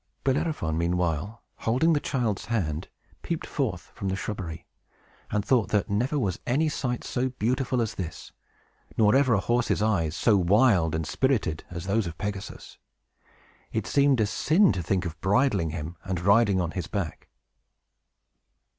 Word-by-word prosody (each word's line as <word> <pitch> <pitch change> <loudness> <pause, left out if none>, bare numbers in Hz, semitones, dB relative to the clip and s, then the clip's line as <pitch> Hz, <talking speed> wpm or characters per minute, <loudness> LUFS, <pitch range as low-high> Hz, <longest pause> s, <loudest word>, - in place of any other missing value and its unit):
Bellerophon, 135 - 0
meanwhile, 90 +4 -1
holding 130 +9 +2
the 150 - +2
child's 120 -8 -1
hand, 85 -9 -2 0.3
peeped - - -3
forth - - -3
from 100 - -4
the 95 - -1
shrubbery, 90 -4 -5 0.6
and 105 -1 -1
thought 120 -2 +2
that 105 -1 0
never 125 +8 0
was 100 -10 -1
any 155 +6 +2
sight 130 -4 -2
so 130 +1 -1
beautiful 125 +1 0
as 110 - -4
this, 85 -4 -6 0.7
nor 105 +1 +5
ever 130 -4 +4
a - - +2
horse's 120 +2 +1
eyes 95 -7 +1
so 110 -4 +3
wild 95 -3 +3
and 80 0 -2
spirited 110 - 0
as 85 0 -6
those 100 0 +1
of 85 - -7
Pegasus. 100 -1 -6 0.9
It - - -2
seemed 140 -3 +3
a 110 - +4
sin 165 - +3
to 95 - -2
think 90 +2 -1
of 85 -1 -6
bridling 100 - +2
him 80 +1 -5
and 95 -3 -2
riding 100 +1 +4
on 85 -2 -1
his 90 -3 -4
back. 100 -7 -4
105 Hz, 155 wpm, -26 LUFS, 90-125 Hz, 0.9 s, nor